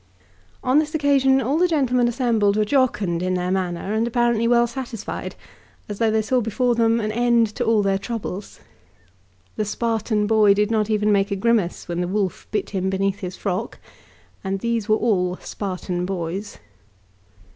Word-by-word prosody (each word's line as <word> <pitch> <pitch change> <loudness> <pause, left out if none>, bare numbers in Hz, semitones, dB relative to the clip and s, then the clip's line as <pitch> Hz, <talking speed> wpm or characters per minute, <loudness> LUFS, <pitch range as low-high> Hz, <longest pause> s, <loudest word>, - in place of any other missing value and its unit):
On 255 +4 +4
this 305 0 -2
occasion 275 -3 +3
all 275 +6 0
the 360 - +4
gentlemen 255 -7 +2
assembled 225 -4 +1
were 215 - +2
jocund 210 -9 +1
in 185 0 0
their 180 0 -1
manner, 185 +1 -2
and 225 +2 +1
apparently 235 -1 +1
well 240 0 +4
satisfied, 240 -3 -6 0.5
as 205 -1 -6
though 225 -1 +3
they 220 0 +1
saw 250 +3 +1
before 240 +3 0
them 230 0 +2
an 215 -1 -2
end 235 0 +3
to 245 - -2
all 225 -3 +2
their 195 -1 +1
troubles. 205 -2 -6 1.0
The 215 - 0
Spartan 220 -1 -1
boy 210 -2 +4
did 210 +2 +1
not 215 -1 +1
even 210 -1 +2
make 200 0 +2
a 200 - -1
grimace 205 -3 0
when 175 0 -2
the 175 - -1
wolf 195 -1 -2
bit 210 - -2
him 190 -2 -1
beneath 195 +1 -1
his 185 -1 -6
frock, 200 +3 -3 0.7
and 195 0 -2
these 230 -1 -2
were 215 - +4
all 180 -6 +1
Spartan 180 -2 -4
boys. 190 +2 -4
215 Hz, 175 wpm, -22 LUFS, 195-235 Hz, 1.0 s, On